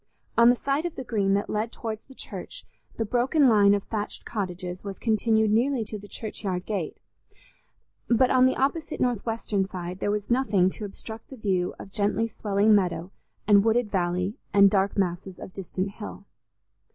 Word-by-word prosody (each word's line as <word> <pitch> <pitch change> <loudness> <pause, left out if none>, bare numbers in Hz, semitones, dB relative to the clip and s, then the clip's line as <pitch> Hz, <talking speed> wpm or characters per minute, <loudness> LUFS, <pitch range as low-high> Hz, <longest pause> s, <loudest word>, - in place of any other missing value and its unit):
On 235 0 +7
the 245 - +5
side 280 +6 -1
of 340 - -8
the 260 - -5
Green 200 -5 +1
that 200 - -1
led 215 +2 -2
towards 220 -3 -5
the 265 - -14
church, - - -8 0.3
the 225 - 0
broken 255 +6 +3
line 205 -3 +6
of 200 - -2
thatched 210 -2 -4
cottages 180 -3 -4
was 200 -1 -6
continued 220 -1 +2
nearly 240 +2 +2
to 210 0 -6
the 205 - -12
churchyard 195 -3 -4
gate; 195 -7 -3 1.1
but 245 +2 +4
on 255 0 +6
the 260 - +1
opposite 280 +4 -1
northwestern 225 -4 -1
side, 180 -1 -6
there - - -1
was 210 +2 -2
nothing 205 -8 +3
to 210 - -7
obstruct 220 +2 -9
the 265 - -10
view 190 -5 0
of 195 - -10
gently 210 +3 0
swelling 210 -1 +2
meadow, 180 -3 +1 0.4
and 200 -1 +6
wooded 225 -1 +2
valley, 180 +4 -1 0.2
and 200 -1 +7
dark 195 0 +1
masses 185 0 -1
of 185 - -10
distant 190 0 -4
hill. 205 -1 -9
210 Hz, 175 wpm, -26 LUFS, 195-230 Hz, 1.1 s, On